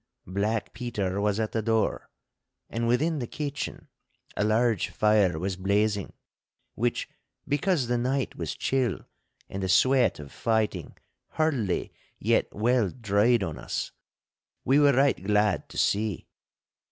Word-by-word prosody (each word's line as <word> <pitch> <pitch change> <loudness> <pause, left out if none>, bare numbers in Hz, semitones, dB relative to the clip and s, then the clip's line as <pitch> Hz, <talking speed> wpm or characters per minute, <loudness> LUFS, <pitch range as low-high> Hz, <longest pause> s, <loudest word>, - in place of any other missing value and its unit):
Black 100 +4 -2
Peter 100 -6 -2
was 105 0 +1
at 110 -1 -1
the 110 - -1
door, 110 0 0 0.6
and 115 0 -1
within 150 +7 +1
the 120 - -3
kitchen 145 +1 -5 0.5
a - - 0
large 110 -1 +2
fire 105 -6 +3
was 95 +3 -2
blazing, 100 +2 0 0.6
which, 120 +2 -1 0.4
because 145 +1 +1
the 120 0 0
night 130 +2 -1
was - - -4
chill 130 -7 0 0.5
and 95 - -5
the 95 - -2
sweat 130 +7 +4
of 70 -2 -10
fighting 110 -2 -1 0.4
hardly 135 - 0 0.2
yet - - +2
well 115 -1 +2
dried 110 +1 +2
on 80 -5 -4
us, - - -4 0.7
we 135 +3 +4
were 145 -1 +5
right 135 -6 +2
glad 105 -1 +1
to - - -10
see. 105 -3 0
110 Hz, 135 wpm, -27 LUFS, 100-125 Hz, 0.7 s, were